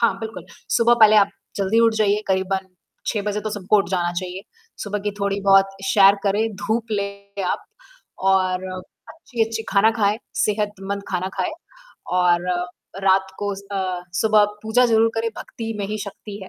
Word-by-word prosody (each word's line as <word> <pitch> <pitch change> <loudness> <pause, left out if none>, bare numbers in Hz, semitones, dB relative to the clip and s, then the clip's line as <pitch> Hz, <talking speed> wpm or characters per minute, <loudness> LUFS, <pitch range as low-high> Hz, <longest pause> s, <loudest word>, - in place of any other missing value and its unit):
हाँ, 230 - +3
बिल्कुल 220 -6 -7 0.3
सुबह 235 0 +5
पहले 215 -1 +8
आप 205 0 +5 0.3
जल्दी 200 +3 +1
उठ 230 -1 +4
जाइए। 210 -1 +2
करीबन 190 0 0 0.4
6 210 - -1
बजे 210 0 -2
तो 215 +1 -4
सबको 205 0 +1
उठ 195 - 0
जाना 175 -2 0
चाहिए। 185 +1 -6 0.4
सुबह 205 0 -3
की - - +2
थोड़ी 200 0 0
बहुत 195 0 +6 0.2
सैर 195 0 +6
करें, 210 +3 +1
धूप 220 +3 -1
लें 200 -1 -4
आप 180 - -2 0.6
और 185 -1 +2 0.4
अच्छी-अच्छी 225 -7 -3
खाना 215 +2 +4
खाएँ, 215 -1 +1 0.2
सेहतमंद 200 -2 -1
खाना 185 0 -2
खाएँ 185 - 0 0.7
और 175 0 +3
अ, 175 0 -1 0.4
रात 190 0 +3
को 205 0 -2
अ, 190 -2 -4 0.2
सुबह 215 -1 +5 0.2
पूजा 245 +3 +3
ज़रूर 225 -1 +3
करें, 225 0 0
भक्ति 225 -1 -6
में 200 - -2
ही 215 +1 -4
शक्ति 200 +1 -8
है, 190 - -9
200 Hz, 165 wpm, -22 LUFS, 190-220 Hz, 0.7 s, पहले